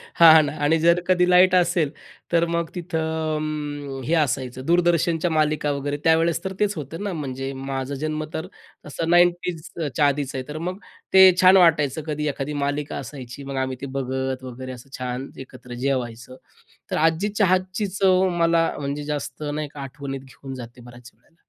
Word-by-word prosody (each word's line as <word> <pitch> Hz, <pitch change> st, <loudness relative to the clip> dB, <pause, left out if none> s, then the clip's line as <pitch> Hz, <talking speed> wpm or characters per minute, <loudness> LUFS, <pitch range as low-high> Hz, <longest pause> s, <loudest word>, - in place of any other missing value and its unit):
हां 160 Hz, -2 st, +9 dB
ना 145 Hz, -, -3 dB
आणि 155 Hz, +3 st, +3 dB
जर 170 Hz, +2 st, +4 dB
कधी 180 Hz, -1 st, +4 dB
लाईट 185 Hz, +1 st, +6 dB
असेल 175 Hz, -4 st, +2 dB, 0.4 s
तर 170 Hz, 0 st, +3 dB
मग 170 Hz, 0 st, -1 dB
तिथं 175 Hz, -1 st, -4 dB
अ, 160 Hz, -1 st, -1 dB
अं, 145 Hz, -3 st, -4 dB
हे 140 Hz, -, -1 dB
असायचं 130 Hz, -4 st, -1 dB
दूरदर्शनच्या 170 Hz, 0 st, +2 dB
मालिका 155 Hz, -1 st, +1 dB
वगैरे, 145 Hz, 0 st, -2 dB
त्यावेळेस 165 Hz, +2 st, +2 dB
तर 190 Hz, -, -4 dB
तेच 210 Hz, -1 st, +1 dB
होतं 160 Hz, +6 st, -6 dB
ना 200 Hz, -2 st, -3 dB
म्हणजे, 135 Hz, -4 st, -4 dB
माझा 135 Hz, 0 st, -4 dB
जन्म 155 Hz, 0 st, -2 dB
तर 160 Hz, -, -4 dB, 0.4 s
असा 150 Hz, +2 st, -4 dB
90ज 175 Hz, -1 st, +3 dB, 0.3 s
च्या 145 Hz, -, +4 dB
आधीच 140 Hz, -1 st, -1 dB
आहे. 130 Hz, -, -3 dB
तर 150 Hz, +1 st, -6 dB
मग 185 Hz, -, -4 dB, 0.4 s
ते 190 Hz, -1 st, +9 dB
छान 185 Hz, +1 st, +7 dB
वाटायचं 155 Hz, -5 st, +3 dB
कधी 150 Hz, 0 st, -2 dB
एखादी 140 Hz, +1 st, -3 dB
मालिका 145 Hz, +1 st, -2 dB
असायची, 130 Hz, -1 st, -8 dB
मग 135 Hz, 0 st, -6 dB
आम्ही 130 Hz, 0 st, -4 dB
ते -, -, -4 dB
बघत 130 Hz, 0 st, -3 dB
वगैरे 130 Hz, +1 st, -7 dB
असं 125 Hz, +1 st, -11 dB
छान 125 Hz, +1 st, -4 dB
एकत्र 125 Hz, -1 st, -12 dB
जेवायचं. 125 Hz, -2 st, -3 dB, 0.6 s
तर -, -, 0 dB
आजी 165 Hz, +6 st, +2 dB
चहाची 185 Hz, +1 st, +1 dB
चव 190 Hz, -1 st, +4 dB
मला 165 Hz, 0 st, +3 dB
म्हणजे 145 Hz, +1 st, -3 dB
जास्त 150 Hz, +1 st, -5 dB
नाही 150 Hz, 0 st, -3 dB
का 145 Hz, -, -8 dB
आठवणीत 135 Hz, 0 st, -6 dB
घेऊन 135 Hz, 0 st, -10 dB
जाते, 120 Hz, 0 st, -10 dB
बऱ्याच 120 Hz, 0 st, -13 dB
वेळेला. 120 Hz, +8 st, -33 dB
150 Hz, 175 wpm, -23 LUFS, 135-170 Hz, 0.6 s, हां